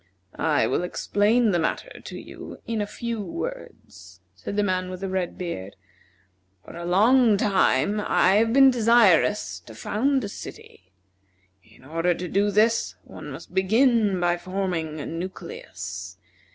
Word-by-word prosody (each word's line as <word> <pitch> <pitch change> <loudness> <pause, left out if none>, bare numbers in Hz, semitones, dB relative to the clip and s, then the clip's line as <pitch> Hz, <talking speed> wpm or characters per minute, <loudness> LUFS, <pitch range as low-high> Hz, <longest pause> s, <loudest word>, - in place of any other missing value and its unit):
"I - - +1
will - - 0
explain 210 +5 +1
the 175 - +1
matter - - -3
to - - -8
you - - -10
in 225 -2 -2
a 205 - -2
few 230 +1 -4
words," 95 - -8
said 95 - -7
the 205 - +2
man 185 -2 -1
with 185 0 -7
the 195 - -2
red 185 -2 -2
beard. 100 - -6 0.9
"For - - -11
a 170 0 -6
long 220 +5 +4
time 200 -1 +2
I 190 +2 +4
have 225 +1 +3
been 270 +1 +7
desirous 215 - +3
to 110 +5 -14
found 260 - 0
a - - -3
city. 95 - -11 0.7
In 110 +5 -21
order 165 +4 0
to 180 - -5
do 200 +4 +1
this 220 +3 +2
one - - -10
must - - -10
begin 210 +1 +3
by 175 0 +1
forming 175 -4 -3
a - - -5
nucleus. 190 - -7
195 Hz, 150 wpm, -24 LUFS, 175-225 Hz, 0.9 s, been